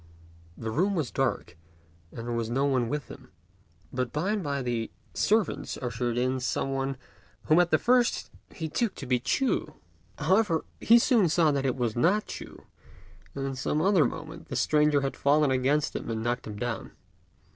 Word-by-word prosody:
The 110 -1 -4
room 190 - +1
was 155 -7 -1
dark, 125 -9 -1 0.6
and 115 - -7
there 120 - -2
was 115 -1 -2
no 135 +4 +1
one 130 -4 +1
with 150 +1 -3
him; 130 -1 -12 0.6
but 125 -1 -2
by 165 +7 -1
and 215 -1 0
by 140 -2 -2
the 120 -2 -2 0.2
servants 215 -1 0
ushered 120 -1 -2
in 130 +1 +1
some 135 +2 -1
one 135 0 -2 0.5
whom 155 +3 +4
at 175 -1 +3
first 245 -1 +2 0.2
he 160 - -5
took 225 +6 -1
to - - -7
be 125 -1 +1
Ch'u. 155 - 0 0.4
However, 170 +1 +2
he 230 - +6
soon 230 -6 +4
saw 160 -1 +3
that 140 -1 0
it 130 - 0
was 120 -4 -1
not 185 - +2
Ch'u, - - -9 0.7
and 135 0 -3
in 130 - -3
another 170 +2 +3
moment 165 +1 -6
the - - -5
stranger 150 -1 +3
had 135 0 -2
fallen 145 0 +3
against 135 +3 +1
him - - -4
and 110 -1 -2
knocked 120 0 -2
him 105 - -6
down. 120 -1 -4
140 Hz, 180 wpm, -28 LUFS, 125-165 Hz, 0.7 s, he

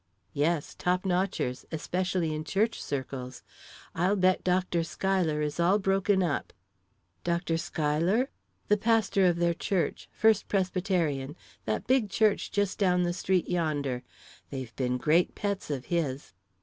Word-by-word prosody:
"Yes; 150 +1 0
top 180 +1 0
notchers; 180 -9 -1
especially 175 0 -1
in 155 0 -3
church 210 +8 0
circles. 130 -2 -5 0.5
I'll 180 +5 +2
bet 185 -1 +2
Dr. 180 -2 +1
Schuyler 165 -3 0
is 150 +2 -3
all 180 +4 +4
broken 195 -1 +2
up." 160 -5 -2 0.7
"Dr. 170 -1 0
Schuyler?" 165 - 0 0.5
"Pastor 220 -3 +3
of 175 - +3
their 170 0 +2
church 180 +1 -2
First 220 -2 +3
Presbyterian 180 -7 0 0.3
that 110 -1 -1
big 255 -5 +2
church 215 0 +2
just 205 -2 0
down 180 -3 +3
the 175 0 0
street 185 0 0
yonder. 145 -7 -1 0.5
They've 130 -4 -6
been 125 -1 0
great 155 +7 +2
pets 200 -4 -3
of 135 -4 -3
his." 145 -6 -2
175 Hz, 135 wpm, -29 LUFS, 150-190 Hz, 0.7 s, all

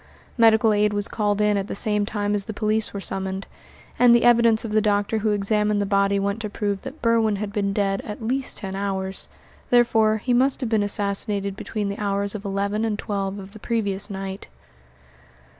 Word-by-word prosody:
Medical 225 -2 +5
aid 210 0 +2
was 205 -1 -1
called 210 -2 0
in 210 -1 +3
at 195 0 -2
the - - -5
same 210 0 0
time 205 -1 -1
as 200 -1 0
the 220 - -6
police 215 0 0
were 200 - -5
summoned; 190 0 -3 0.5
and 245 -1 +7
the 235 - +3
evidence 235 -2 +4
of 220 - -4
the 215 0 +3
doctor 205 +1 +1
who 215 +1 0
examined 210 0 +1
the 205 - 0
body 200 0 +2
went 200 +2 -1
to 210 - -4
prove 205 -1 -2
that 265 +1 -9
Berwin 225 -2 +3
had 200 0 -5
been 200 -1 0
dead 195 -1 0
at 210 - -7
least 255 +4 -2
ten 190 -2 -4
hours; 195 -1 -3 0.4
therefore, 225 -3 +4
he 245 +4 -1
must 260 +3 +2
have 245 -4 -3
been 220 -2 +3
assassinated 200 0 -1
between 210 0 -4
the 200 +1 -4
hours 200 -1 -1
of 210 -2 -6
eleven 200 +2 -1
and 220 -2 -1
twelve 200 -2 -3
of 195 0 -9
the 215 - -12
previous 205 -3 -1
night. 195 0 -6
205 Hz, 205 wpm, -23 LUFS, 200-220 Hz, 0.5 s, and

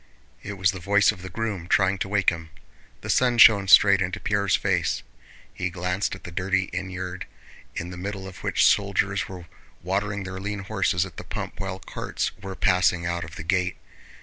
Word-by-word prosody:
It 105 - -6
was 95 -2 +2
the 95 - -7
voice 100 +4 +3
of 100 -4 -11
the 95 - -7
groom, 100 -3 -4
trying 95 0 +2
to - - -2
wake 100 -2 +3
him. 80 -1 -8 0.5
The - - -8
sun 125 -2 +3
shone 100 -3 +7
straight 100 0 +7
into 90 0 -2
Pierre's 100 -3 +1
face. - - 0 0.5
He 90 - -2
glanced 90 +3 -2
at 95 - -14
the 85 - -8
dirty 95 +2 -1
innyard 90 0 -5 0.5
in 85 +2 -5
the 90 - -8
middle 100 0 -5
of 95 - -10
which - - +2
soldiers - - +1
were 90 -2 -9 0.4
watering 100 +2 -2
their 95 0 -6
lean 100 +1 -4
horses 95 -4 0
at - - -12
the - - -6
pump - - -6
while 95 -1 -4
carts - - -4
were 95 -1 -6
passing 90 -2 +2
out 85 0 -2
of 85 +3 -10
the - - -7
gate. 90 +1 0
95 Hz, 195 wpm, -25 LUFS, 90-100 Hz, 0.5 s, shone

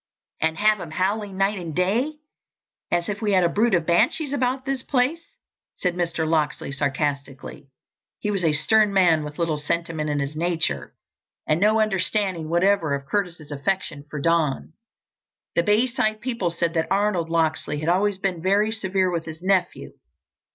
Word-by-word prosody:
"And 160 0 +1
have 215 0 +3
him 170 - -7
howling 195 +4 -1
night 195 +1 +1
and 165 -4 -6
day 230 +12 +1 0.7
as 170 -1 0
if 205 +1 -4
we 210 -2 +1
had 185 -1 +4
a 170 - +3
brood 215 +3 +2
of 170 -2 0
banshees 245 - +2
about 260 -1 0
the 275 0 0
place?" 280 +6 +1 0.5
said 180 -2 0
Mr. 170 -2 -1
Locksley 155 -3 0
sarcastically. 140 0 -3 0.5
He 210 - -2
was 195 -3 -1
a 160 - +3
stern 210 +7 +3
man 170 -5 +4
with 150 0 -8
little 165 -3 0
sentiment 160 0 -2
in 145 - 0
his 140 +1 -3
nature 160 - -1 0.5
and 155 +1 +1
no 215 +2 +4
understanding 195 -5 0
whatever 175 -3 +2
of 140 0 -7
Curtis's 170 -3 -3
affection 145 0 -2
for 150 - -5
Don. 160 -1 0 0.8
The - - +3
Bayside 215 0 +1
people 230 -6 -2
said 170 0 -1
that 160 -2 0
Arnold 195 -4 +1
Locksley 160 -2 0
had 155 - -1
always 195 +2 +2
been 190 -3 -2
very 200 +4 +2
severe 190 -4 0
with 170 -2 -2
his 160 +1 -9
nephew. 185 -2 0
180 Hz, 165 wpm, -24 LUFS, 160-210 Hz, 0.8 s, had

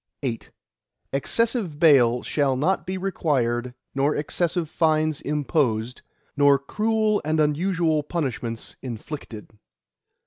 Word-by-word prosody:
VIII 120 -4 -1 0.7
Excessive 215 - 0
bail 125 -7 +5
shall 140 -3 +1
not 175 +9 0
be 190 0 -2
required 125 -10 -1 0.2
nor 140 +2 +1
excessive 170 +2 -1
fines 155 -1 +1
imposed, 135 -6 -1 0.3
nor 145 -1 +5
cruel 215 +8 0
and 155 +1 0
unusual 160 +1 +1
punishments 130 -7 -4
inflicted. 120 -2 -7
150 Hz, 100 wpm, -24 LUFS, 130-170 Hz, 0.7 s, bail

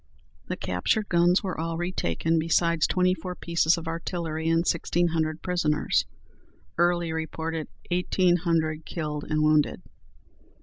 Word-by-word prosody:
The - - -3
captured 90 - -1
guns 175 +2 +3
were 185 -5 -3
all 165 0 -2
retaken, 165 - 0
besides 165 0 +2
twenty 185 0 +2
four 180 0 -6
pieces 170 -1 +2
of 165 0 -7
artillery 165 -1 -3
and 165 +1 +2
sixteen 170 +1 +1
hundred 160 -1 -1
prisoners. 155 -5 +1 0.7
Early 175 -1 +1
reported 160 0 -3 0.2
eighteen 180 0 +2
hundred 160 -2 0
killed 150 -3 -4
and 155 0 +1
wounded. 155 -1 +2
165 Hz, 130 wpm, -26 LUFS, 160-175 Hz, 0.7 s, guns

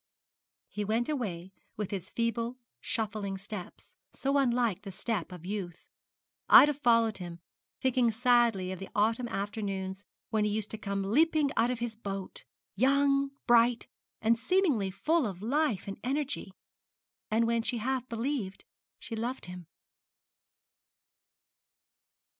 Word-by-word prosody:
He 210 - -4
went 225 +5 0
away 190 - -3 0.3
with 210 -2 -3
his 190 -1 -4
feeble 230 +1 -1 0.2
shuffling 210 - -3
steps, 195 -1 -9 0.2
so 275 +1 0
unlike 240 -7 +1
the 200 -1 -7
step 190 -2 -3
of 180 -2 -9
youth; 185 -3 -5 0.6
Ida 295 +1 +9
following 230 -5 +3
him, 175 -3 -8 0.4
thinking 255 -2 +3
sadly 230 -5 +3
of 190 - -5
the 195 - -7
autumn 225 +4 +2
afternoons 195 -2 -3 0.3
when 215 -1 +2
he 210 - +2
used 210 0 -2
to 220 - -4
come 200 -2 -2
leaping 295 +7 +3
out 230 +2 +3
of 250 - -1
his 235 -1 -3
boat 195 -3 -6 0.3
young, 275 +4 +3 0.2
bright, 235 0 +4 0.4
and 230 +1 +3
seemingly 295 - +2
full 305 - +1
of 190 -1 -7
life 270 -5 0
and 195 - -6
energy, 275 -5 -2 0.8
and 225 +2 +3
when 230 0 +2
she 240 +2 -2
half 255 +2 -2
believed 230 -4 -3 0.3
she 225 - -6
loved 240 +4 -3
him. 180 -2 -9
225 Hz, 135 wpm, -30 LUFS, 195-250 Hz, 0.8 s, Ida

